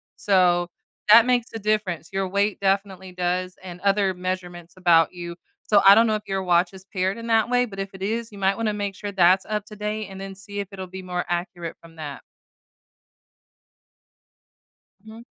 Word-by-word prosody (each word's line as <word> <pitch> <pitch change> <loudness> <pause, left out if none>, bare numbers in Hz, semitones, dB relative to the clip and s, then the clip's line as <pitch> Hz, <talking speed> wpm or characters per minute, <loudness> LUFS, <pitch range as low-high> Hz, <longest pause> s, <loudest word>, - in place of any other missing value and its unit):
so, 180 -3 +2 0.4
that 230 +1 +9
makes 245 -1 +1
a 225 - -4
difference. 205 -6 -1
Your 195 0 -1
weight 200 +2 0
definitely 195 -1 -1
does 180 0 -2
and 180 -1 -9
other 200 -1 +2
measurements 180 -2 -5
about 170 -3 +4
you, 175 -1 -7 0.3
so 205 -2 +4
I 200 - +11
don't 230 +2 +5
know 215 - +1
if 210 - -4
your 195 0 -1
watch 175 +1 +2
is 190 0 -12
paired 190 +2 0
in 230 0 -7
that 225 0 +3
way, 245 0 +3
but 200 -5 -11
if 195 0 -3
it 190 - -12
is, 225 +3 -2
you 205 - -11
might 195 0 +1
wanna 225 -2 0
make 205 -1 -3
sure 205 +1 -6
that's 185 0 +4
up 210 -1 -2
to 210 - -11
date 210 0 -3
and 190 0 -10
then 195 0 -6
see 200 +1 -8
if 200 - -3
it'll 190 -1 -7
be 190 +1 -8
more 180 -1 -3
accurate 175 -1 -3
from 165 -1 -16
that. 145 -3 -7 2.8
Mhm. 220 +1 -11
195 Hz, 195 wpm, -24 LUFS, 180-210 Hz, 2.8 s, I